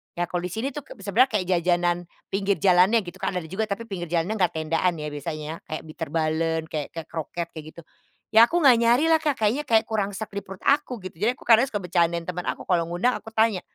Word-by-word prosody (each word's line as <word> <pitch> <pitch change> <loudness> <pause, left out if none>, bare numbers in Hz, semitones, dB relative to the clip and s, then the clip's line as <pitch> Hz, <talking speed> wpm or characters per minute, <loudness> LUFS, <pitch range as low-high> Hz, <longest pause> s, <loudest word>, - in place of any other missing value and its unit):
Ya 175 0 -1
kalau 175 -1 -2
di 180 - -10
sini, 230 +7 -2
tuh 295 - -5
k - - -11
sebenarnya 235 +7 +3
kayak 180 - -4
jajanan, 175 0 +1 0.3
pinggir 195 0 +1
jalannya 190 +4 +5
gitu 175 - -10
kan, - - -2
ada 180 - -2
juga. 190 +6 -2
Tapi 200 +3 -3
pinggir 175 -3 -4
jalan 170 +4 0
enggak 180 -3 +1
tendaan 165 +3 0
ya, 150 0 -5
biasanya 155 +2 -5
kayak 155 - -5
Bitterballen, 160 0 -1
kayak 150 -2 -3
ke 165 - -3
kroket 170 +1 -4
kayak 155 -1 -7
gitu. 170 - -10 0.5
Ya 225 +2 +9
aku 345 +1 +1
nggak 265 -5 +7
nyari 240 +6 +4
lah, 320 - +6
Kak. 295 -4 -1
Kayaknya 225 +8 +1
kayak 225 -2 +4
kurang 205 -2 -1
sreg 220 - -5
di 200 - -2
perut 190 0 -10
aku, 260 -4 +2
gitu. 185 - -8
Jadi 230 +4 +3
aku - - -16
kadang 230 +2 +7
suka 205 -5 -3
bercandain 170 -1 +1
teman 180 0 -4
aku. - - -2
Kalau 170 -2 +2
ngundang 190 +9 +1
aku 225 - -11
tanya, 220 -4 +2
180 Hz, 235 wpm, -25 LUFS, 170-220 Hz, 0.5 s, Ya